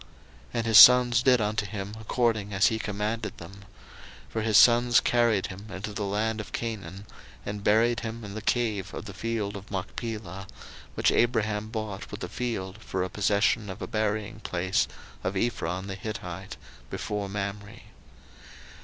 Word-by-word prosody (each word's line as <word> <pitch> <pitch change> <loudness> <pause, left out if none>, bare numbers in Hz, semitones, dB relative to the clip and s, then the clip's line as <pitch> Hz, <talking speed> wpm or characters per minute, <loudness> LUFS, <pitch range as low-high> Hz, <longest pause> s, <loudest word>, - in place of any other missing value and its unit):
01:050:012 - - -25 0.5
And 115 -1 0
his 110 -2 +5
sons 125 -2 +9
did 125 -1 +4
unto 105 0 0
him 100 0 -6
according 110 -2 0
as 95 +2 +5
he 110 -1 -2
commanded 105 +2 -3
them: 85 +2 -10
01:050:013 100 - -13 0.7
For 110 - -2
his 110 -1 +3
sons 120 0 +6
carried 115 -5 +2
him 100 +2 -8
into 105 +2 -6
the 100 0 -3
land 110 +2 -1
of 105 - -11
Canaan, 105 -4 -5 0.4
and 105 0 -5
buried 115 +3 +3
him 115 0 -6
in 100 - -7
the 110 - -5
cave 110 -3 -1
of - - -6
the 100 - -8
field 105 -1 -3
of 100 0 -9
Machpelah, 95 -1 -5 0.5
which - - +3
Abraham 110 -3 +1
bought 110 -3 -5
with 105 - -8
the - - -3
field 110 -6 -4
for 95 -4 -3
a 95 - -3
possession 105 +2 +1
of 95 +2 -7
a - - -5
buryingplace 105 -4 -1 0.4
of 95 +1 -2
Ephron 95 -4 -1
the 100 - -5
Hittite, 95 -2 -6 0.3
before 105 -1 -3
Mamre. 100 +2 -5
105 Hz, 165 wpm, -27 LUFS, 100-115 Hz, 0.7 s, sons